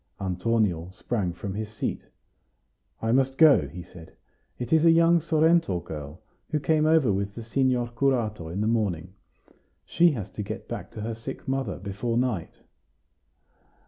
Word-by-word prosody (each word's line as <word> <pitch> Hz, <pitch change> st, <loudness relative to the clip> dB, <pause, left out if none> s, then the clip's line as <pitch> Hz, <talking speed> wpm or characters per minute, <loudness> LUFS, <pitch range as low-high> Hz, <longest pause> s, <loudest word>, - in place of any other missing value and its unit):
Antonio 95 Hz, -2 st, 0 dB
sprang 95 Hz, -1 st, -2 dB
from 95 Hz, +3 st, -6 dB
his 105 Hz, +1 st, -4 dB
seat. 110 Hz, -, -3 dB, 1.0 s
"I 115 Hz, -, +1 dB
must 135 Hz, +1 st, +2 dB
go," 155 Hz, -4 st, +6 dB
he 90 Hz, +1 st, -8 dB
said. 85 Hz, -2 st, -14 dB, 0.4 s
"It 120 Hz, +4 st, -3 dB
is 160 Hz, -1 st, +5 dB
a 165 Hz, -, +7 dB
young 165 Hz, +1 st, +5 dB
Sorrento 160 Hz, -, +2 dB
girl, 75 Hz, +3 st, -8 dB, 0.3 s
who 150 Hz, -, 0 dB
came 155 Hz, +1 st, +2 dB
over 155 Hz, -9 st, +4 dB
with 100 Hz, +1 st, -2 dB
the 115 Hz, -, -6 dB
signor 125 Hz, +1 st, +1 dB
curato 120 Hz, -8 st, 0 dB
in 95 Hz, +5 st, -3 dB
the 105 Hz, -, +1 dB
morning. 95 Hz, -6 st, -1 dB, 0.7 s
She 170 Hz, -1 st, +4 dB
has 105 Hz, -8 st, -5 dB
to -, -, -5 dB
get 100 Hz, -, -6 dB
back -, -, -6 dB
to 110 Hz, -, -7 dB
her 115 Hz, +2 st, -3 dB
sick 115 Hz, +4 st, -8 dB
mother 135 Hz, -7 st, -2 dB
before 100 Hz, +5 st, -3 dB
night." 120 Hz, -9 st, -2 dB
115 Hz, 160 wpm, -26 LUFS, 95-135 Hz, 1.0 s, a